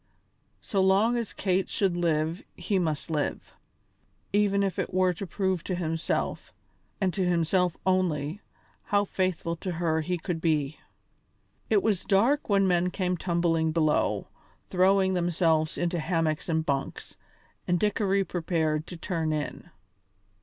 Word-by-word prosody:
So 195 -3 0
long 195 +5 +4
as 235 -3 -2
Kate 190 -1 0
should 190 -4 +1
live 165 0 0
he 185 +2 -1
must 160 -2 -2
live, 150 -2 -2 0.8
even 200 -1 +3
if 195 -2 -1
it - - -2
were 185 0 +2
to 190 +3 -6
prove 190 -3 -1
to 185 - -1
himself, 165 -2 -2 0.5
and 190 -4 +1
to 195 - 0
himself 180 0 +1
only, 185 -2 0 0.4
how 205 0 +2
faithful 185 -3 -1
to 185 +1 -4
her 160 -1 0
he 180 +3 -2
could 165 -1 -4
be. 155 -3 0 0.9
It 400 - +3
was 200 -4 +1
dark 230 +10 +2
when 195 -1 +4
men 180 0 +2
came 180 -1 -1
tumbling 170 -2 +1
below, 155 -2 +1 0.4
throwing 190 +1 +3
themselves 165 -3 +1
into 175 0 -1
hammocks 165 -1 -1
and 160 -1 +1
bunks, 140 -2 -3 0.5
and 175 -1 +2
Dickory 200 -1 +1
prepared 160 -4 -1
to 175 - -8
turn 165 -2 -2
in. 155 +3 -4
175 Hz, 140 wpm, -27 LUFS, 160-190 Hz, 0.9 s, long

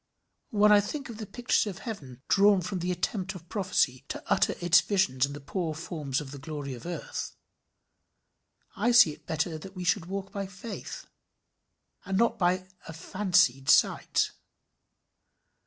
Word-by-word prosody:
When 210 0 +4
I 205 -1 +7
think 275 +6 -5
of 225 -2 -8
the 215 - -6
pictures 245 -1 +1
of 190 - -7
heaven 135 - -7
drawn 200 -1 +5
from 185 +1 -3
the 180 +1 -1
attempt 190 +2 -2
of 170 -1 -11
prophecy 180 - 0
to - - -6
utter - - +2
its 175 +1 +5
visions 140 -10 +1
in 140 - -7
the 145 - -7
poor 160 +2 -3
forms 150 -4 -3
of 140 -3 -8
the 140 - -8
glory 145 -2 -5
of 125 +6 -9
earth, 175 - -5 1.4
I 240 - +2
see 235 -10 +8
it - - -14
better 160 0 -1
that 190 +4 -11
we 180 - -5
should 175 -1 +1
walk 195 +1 -5
by 200 -1 -4
faith, 200 +4 -8 1.0
and 195 -1 -2
not 230 +1 +2
by 185 0 +1 0.2
a 165 - -7
fancied 175 -6 +1
sight. - - +3
180 Hz, 165 wpm, -28 LUFS, 155-200 Hz, 1.4 s, see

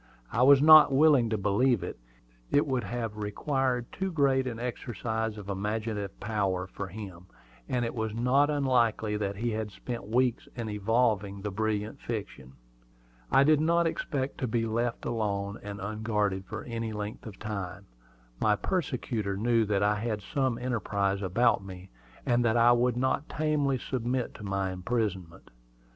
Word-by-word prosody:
I 115 - 0
was 140 +2 +7
not 155 -2 +9
willing 135 -4 +5
to 110 - 0
believe 105 +4 +2
it. - - -6 0.5
It 145 - +3
would 130 -4 -1
have 115 -3 -4
required 125 +4 -1
too 190 0 -3
great 135 -4 +2
an 120 -2 -4
exercise 115 -2 -3
of 100 -2 -9
imaginative 105 0 -3
power 100 -4 -1
for 95 +1 -6
him; 95 -3 -9 0.4
and 125 -1 0
it 115 - -3
was 110 -2 -2
not 125 +6 +2
unlikely 120 -7 +1
that 100 -1 -2
he 115 +4 -2
had 110 -1 -3
spent 115 -1 -6
weeks 125 +2 +1
in 115 -3 -4
evolving 105 -2 0
the 105 - -3
brilliant 105 +1 -2
fiction. 100 - -6 0.8
I 135 - +6
did 155 +1 +4
not 170 +2 +3
expect 140 -4 -2
to 130 - -1
be 115 0 0
left 115 +2 -2
alone 100 -3 -2
and 100 0 -7
unguarded 105 -2 -1
for 110 - -6
any 115 -1 -4
great 110 - -6
length 105 +2 -6
of 100 -3 -9
time. 100 -2 -5 0.5
My 105 -1 +3
persecutor 120 - -2
knew 115 +1 +2
that 100 -1 +1
I 105 +1 +2
had 110 -2 -3
some 130 -5 -1
enterprise 100 -5 -1
about 100 +2 +2
me, 95 -1 -10 0.3
and 120 0 +2
that 115 0 +2
I 120 +1 +6
would 120 0 +2
not 130 +3 0
tamely 150 -3 0
submit 125 0 -2
to 105 - -11
my 95 -1 -1
imprisonment. 95 -3 -3
115 Hz, 165 wpm, -29 LUFS, 100-125 Hz, 0.8 s, not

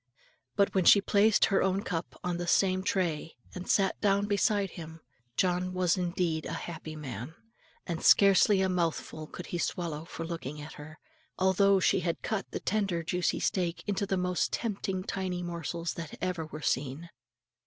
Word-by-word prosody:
But 200 - +2
when 190 - +2
she 200 - +8
placed 205 +2 +4
her 195 - +2
own 190 +1 +1
cup 165 -2 -4
on 180 -1 -1
the 175 0 -4
same 185 0 +3
tray, 175 -5 -1 0.2
and 180 0 -7
sat 195 -2 +2
down 200 -1 +3
beside 205 -1 +1
him, 160 -1 -9 0.4
John 180 0 +1
was 180 -2 +2
indeed 175 -3 -1
a - - -4
happy 160 -2 -7
man; 135 0 -7 0.5
and 170 -2 -4
scarcely 200 0 +6
a - - +2
mouthful 165 -3 -2
could 175 - -8
he 175 - -1
swallow 165 -3 -3
for 165 -1 -6
looking 155 -4 -5
at 150 +2 -8
her, 155 +1 -11 0.4
although 190 +1 +4
she 185 - +3
had 170 -2 -2
cut 220 -3 -2
the - - -4
tender 195 -6 -1
juicy 180 +2 0
steak 175 -2 -1
into 200 -1 -1
the 190 - 0
most 180 0 0
tempting 195 -4 -2
tiny 185 -2 -3
morsels 170 -1 -4
that 165 -3 -7
ever 180 -3 -2
were 155 0 -8
seen. 140 +6 -2
180 Hz, 175 wpm, -30 LUFS, 165-195 Hz, 0.5 s, she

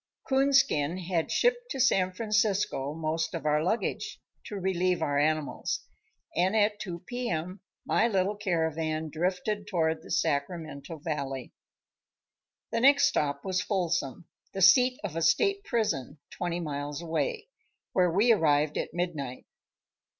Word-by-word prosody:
Coonskin 265 - +3
had 175 -2 -2
shipped 485 0 +1
to 270 - -4
San 190 -7 +3
Francisco 205 -8 0
most 160 +1 -2
of 165 - -5
our 150 0 +2
luggage, 220 +7 -2 0.3
to 210 - -6
relieve 185 -2 0
our 145 -3 0
animals, 155 0 0 0.5
and 185 +5 +2
at 210 -1 +2
two 175 -5 -6
p. 245 +1 -3
m. 175 +4 -3 0.3
my - - +3
little 195 -1 +1
caravan 160 -5 -1
drifted 185 +5 -2
toward 160 -5 0
the - - -14
Sacramento 155 0 -2
Valley. 140 -4 -4 1.2
The 230 - 0
next 280 +3 +6
stop 140 -1 -1
was 185 -1 0
Folsom, 175 - -1 0.3
the 195 - -3
seat 250 +7 +6
of 190 -6 -4
a 165 - -1
state 395 - +2
prison, 185 - -1
twenty 175 -1 -3
miles 145 -1 -4
away, 435 - -2 0.4
where 180 -1 +3
we 205 +8 +4
arrived 150 -6 +2
at - - -5
midnight. 150 -8 -3
175 Hz, 135 wpm, -28 LUFS, 155-210 Hz, 1.2 s, next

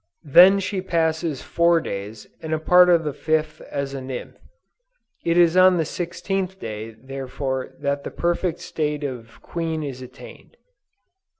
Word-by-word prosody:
Then 180 +7 +7
she 190 0 -2
passes 160 -4 -1
four 170 0 +3
days 105 -4 -6 0.2
and 160 0 -2
a - - -3
part 180 +3 +6
of 170 -2 +4
the 150 -2 -3
fifth 155 0 -1
as 140 -1 -3
a 135 - -5
nymph. 130 -1 -7 0.9
It 170 0 +1
is 170 -1 +5
on 185 0 +6
the 165 - +1
sixteenth 185 +3 -3
day 110 0 -6
therefore 130 0 -5
that 140 0 -2
the - - -5
perfect 175 0 -1
state 150 -1 -3
of 120 -5 -7
queen 165 -2 -3
is 135 -3 -6
attained." 125 - -13
155 Hz, 155 wpm, -23 LUFS, 135-175 Hz, 0.9 s, Then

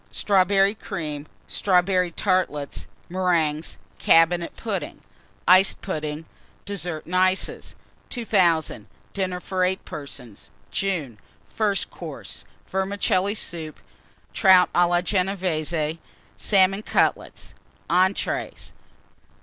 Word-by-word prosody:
Strawberry 195 0 +3
Cream. 150 -8 -5 0.2
Strawberry 180 -1 +2
Tartlets, 170 -6 -1 0.2
Meringues. 170 -4 0 0.2
Cabinet 170 +1 +3
Pudding. - - -4 0.5
Iced 185 +2 +6
Pudding. 155 -3 -4 0.4
DESSERT 175 -6 -4
AND 180 - -5
ICES. 185 +1 +1 0.3
2000. 185 - +1 0.3
DINNER 185 -2 -2
FOR 185 0 -2
8 185 +1 -1
PERSONS 125 -7 -9 0.2
(June). 160 - -2 0.3
FIRST 205 -3 -1
COURSE. - - -9 0.2
Vermicelli 195 +1 0
Soup. 165 -6 -5 0.5
Trout 185 -3 +5
à 175 0 +4
la 175 0 +2
Genévése 175 -5 -1 0.4
Salmon 195 0 +2
Cutlets. - - -1 0.3
ENTREES. 185 +3 0
180 Hz, 90 wpm, -24 LUFS, 165-195 Hz, 0.5 s, Iced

